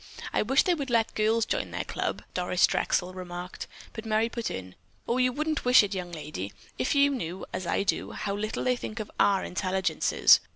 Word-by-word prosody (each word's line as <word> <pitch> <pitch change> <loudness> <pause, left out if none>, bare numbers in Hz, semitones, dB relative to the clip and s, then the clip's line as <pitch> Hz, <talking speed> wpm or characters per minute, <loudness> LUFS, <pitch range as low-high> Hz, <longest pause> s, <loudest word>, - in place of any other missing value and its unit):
I - - +3
wish 270 +6 +4
they 360 - +3
would 280 -5 -3
let 230 -2 +2
girls 220 +1 +2
join - - -1
their - - -3
club," - - -3
Doris 180 0 +3
Drexel 180 0 0
remarked, 180 -1 -7 0.3
but 220 - -6
Merry 220 +1 +1
put 235 -1 -3
in: 95 -1 -6 0.3
"You 250 +1 +2
wouldn't 305 +3 -1
wish 250 -2 +7
it, 205 0 -2
young 180 -2 -4
lady, 150 - -6 0.3
if 260 - +1
you 280 0 +5
knew, 190 -8 -4
as 185 - -3
I - - +1
do, 200 - -1
how 200 - -3
little 215 +1 -2
they 250 0 +2
think 225 -2 -6
of 215 - -5
our 195 -2 +4
intelligences. 190 0 +3
215 Hz, 200 wpm, -28 LUFS, 180-245 Hz, 0.3 s, wish